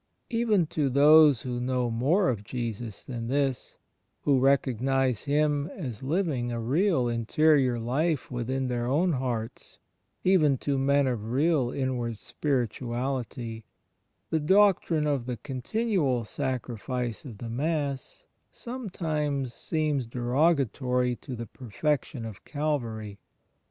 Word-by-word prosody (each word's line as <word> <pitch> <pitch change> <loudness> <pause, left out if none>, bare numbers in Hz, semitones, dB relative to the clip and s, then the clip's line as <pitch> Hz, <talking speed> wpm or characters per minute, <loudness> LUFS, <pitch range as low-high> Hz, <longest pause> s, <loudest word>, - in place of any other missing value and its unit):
Even 225 -6 +2
to 150 -2 -1
those 145 0 +6
who 125 -1 -3
know 125 -1 0
more 150 - +2
of 110 -5 -2
Jesus 115 -1 -5
than 120 -3 -5
this 135 -1 -1 0.2
— - - -49
who 140 -2 +3
recognize 135 -2 +2
Him 145 0 +1
as 125 - -6
living 135 -5 -1
a 120 - -2
real 135 - +2
interior 125 +3 +3
life 140 +7 -1
within 130 +2 -2
their 120 -1 -1
own 165 +8 +2
hearts 125 -3 -4 0.2
— - - -48 0.2
even 155 -7 +4
to 140 +1 -1
men 140 +1 +3
of 115 -4 -2
real 140 -1 +2
inward 125 -4 -2
spirituality, 120 -2 -3 0.7
the 160 - +2
doctrine 175 -2 +3
of 140 -5 -1
the 125 -2 -3
continual 135 - -1
Sacrifice 125 -2 -3
of 120 -7 -9
the 115 - -7
Mass 145 - -2 0.2
sometimes 155 - -3
seems 150 -5 -1
derogatory 125 -1 +1
to 130 - -7
the 115 0 -5
Perfection 125 +2 -2
of 110 -4 -9
Calvary. 115 -9 -3
130 Hz, 125 wpm, -27 LUFS, 120-150 Hz, 0.7 s, those